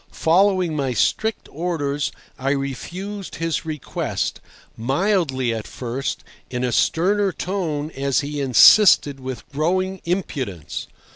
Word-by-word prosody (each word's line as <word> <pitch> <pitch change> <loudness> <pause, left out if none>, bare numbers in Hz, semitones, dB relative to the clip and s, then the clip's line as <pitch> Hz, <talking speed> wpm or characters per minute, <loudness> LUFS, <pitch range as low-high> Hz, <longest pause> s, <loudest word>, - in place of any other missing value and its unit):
Following 180 0 +2
my 135 -3 -1
strict 220 - 0
orders, 145 -4 -2 0.3
I 135 +1 -1
refused 180 - -5
his 165 -1 -2
request, 155 -3 -3 0.3
mildly 135 - 0
at 110 -1 -5
first, 130 +2 -4 0.3
in 125 0 -3
a 125 - 0
sterner 195 - +2
tone 165 -5 -3
as 140 0 0
he 145 0 -4
insisted 140 - +6
with 130 -2 -7
growing 185 +6 0
impudence. 135 - -3
150 Hz, 115 wpm, -22 LUFS, 135-185 Hz, 0.3 s, insisted